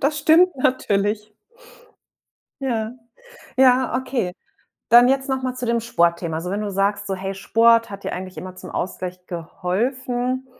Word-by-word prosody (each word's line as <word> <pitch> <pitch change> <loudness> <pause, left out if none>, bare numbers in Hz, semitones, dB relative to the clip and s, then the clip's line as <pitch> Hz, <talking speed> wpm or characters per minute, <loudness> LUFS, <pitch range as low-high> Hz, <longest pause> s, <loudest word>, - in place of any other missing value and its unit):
das 300 +2 +1
stimmt 330 +5 +5
natürlich. 210 -4 0 1.3
Ja. 230 -4 -2 0.7
Ja, 255 -1 +4
okay. 255 -7 -2 0.6
Dann 240 +2 +7
jetzt 270 +1 +1
noch 265 -1 -1
mal 255 -1 -2
zu 250 -1 -5
dem 235 0 +1
Sportthema. 170 -6 0
Also, 170 +3 -4
wenn 200 +2 -2
du 205 - -3
sagst, 200 +1 0
so, 195 - -2
hey, 195 +1 -4
Sport 230 +3 +3
hat 200 0 -9
dir - - -3
eigentlich 185 +1 -7
immer 185 0 -8
zum - - -10
Ausgleich 180 0 -5
geholfen, 245 +9 -2
225 Hz, 155 wpm, -22 LUFS, 190-255 Hz, 1.3 s, Dann